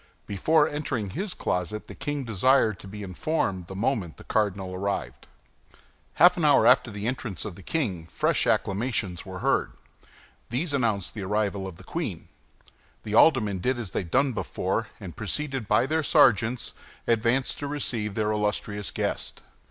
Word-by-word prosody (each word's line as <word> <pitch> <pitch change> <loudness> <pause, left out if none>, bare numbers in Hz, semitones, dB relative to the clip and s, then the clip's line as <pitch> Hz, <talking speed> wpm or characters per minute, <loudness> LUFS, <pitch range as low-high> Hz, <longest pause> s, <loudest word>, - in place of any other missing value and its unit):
Before 150 - +3
entering 140 - -3
his 195 - -3
closet 90 +4 -2
the - - -10
king 145 -1 -3
desired 110 -2 +3
to 100 - -10
be 105 +1 -7
informed 95 - -2
the 95 - -8
moment 100 - -1
the - - -12
cardinal 100 -3 -1
arrived. 90 -11 -3 0.9
Half 175 +3 +6
an 170 - -1
hour 145 -6 +5
after 125 0 +5
the 100 -1 -5
entrance 115 -6 -3
of 105 - -5
the 95 - -13
king, 95 - -2
fresh - - +1
acclamations 100 -4 0
were 95 -1 -7
heard; - - +2 0.8
these 145 +6 -2
announced 110 -8 0
the 110 - -6
arrival 100 0 -1
of 95 - -8
the - - -14
queen. - - -4 0.7
The 105 - -5
aldermen 110 - +5
did 125 +7 0
as 110 -6 -5
they - - -1
had 90 - -6
done 135 +6 +2
before, 110 0 -2
and 90 -6 -8
preceded 135 - -3
by 105 +4 +3
their 160 +3 +1
sergeants, 115 -3 +3 0.3
advanced 115 +3 +1
to 145 - -3
receive 115 -8 -2
their 110 -1 +1
illustrious 105 -1 -1
guest. - - -3
110 Hz, 165 wpm, -26 LUFS, 95-130 Hz, 0.9 s, Half